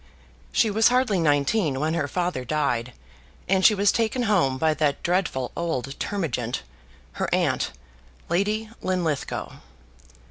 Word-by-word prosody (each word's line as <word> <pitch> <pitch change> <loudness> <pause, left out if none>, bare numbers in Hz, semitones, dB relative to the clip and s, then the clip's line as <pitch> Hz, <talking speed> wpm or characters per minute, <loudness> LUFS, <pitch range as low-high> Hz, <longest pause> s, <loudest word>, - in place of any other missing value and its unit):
She 220 - +3
was 220 +2 +4
hardly 245 -6 +2
nineteen 145 0 +2
when 155 +2 0
her 155 -4 0
father 175 -4 -2
died 125 -4 -1 0.5
and 190 0 +2
she 215 - +7
was 200 0 +3
taken 230 +2 0
home 175 - +2
by 155 +3 +2
that 145 -2 0
dreadful 170 -8 0
old 135 -6 -2
termagant, 125 - -2 0.5
her - - -3
aunt, - - +1 0.6
Lady 210 +5 0
Linlithgow. 175 -6 -2
170 Hz, 130 wpm, -25 LUFS, 140-200 Hz, 0.6 s, she